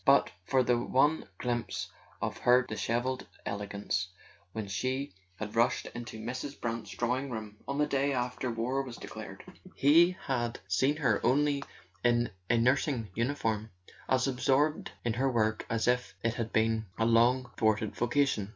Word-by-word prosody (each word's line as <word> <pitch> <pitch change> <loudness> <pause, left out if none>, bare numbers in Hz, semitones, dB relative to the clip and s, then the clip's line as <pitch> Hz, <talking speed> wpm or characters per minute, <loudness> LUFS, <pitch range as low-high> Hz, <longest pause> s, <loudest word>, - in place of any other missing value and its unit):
But - - +5 0.2
for 130 -1 +3
the 120 -1 +2
one 135 +2 +2
glimpse 120 -1 -2 0.3
of - - -2
her 125 +1 +5
dishevelled 120 +2 -2 0.2
elegance, 100 -2 -2 0.4
when 110 0 -4
she 130 +5 -2 0.2
had 105 +3 -6
rushed 115 +1 +2
into 120 -2 -7
Mrs. 130 +5 -5
Brant's 115 -3 -3
drawing 125 +7 -1
room 110 -3 -6
on 140 - -2
the 150 - +3
day 140 0 +1
after 125 0 -1
war 120 +4 -1
was 125 -3 -7
declared, - - -8 0.3
he 170 +6 +5
had 120 -4 -1
seen 130 +10 +2
her 125 -9 +1
only 140 +3 +3 0.4
in 120 -1 +3 0.2
a 115 - +4
nursing 125 -1 +2
uniform, 115 -3 -1 0.4
as 130 0 +3
absorbed 135 +3 +1 0.2
in 115 - +1
her 130 +3 +1
work 110 -2 0
as 115 -1 0
if 125 0 +1
it 115 -1 +1
had 115 -2 -3
been 110 0 +1
a 115 - +2
long 120 +2 +4
thwarted 110 -1 +1
vocation. 120 -4 +1
120 Hz, 155 wpm, -31 LUFS, 110-130 Hz, 0.4 s, But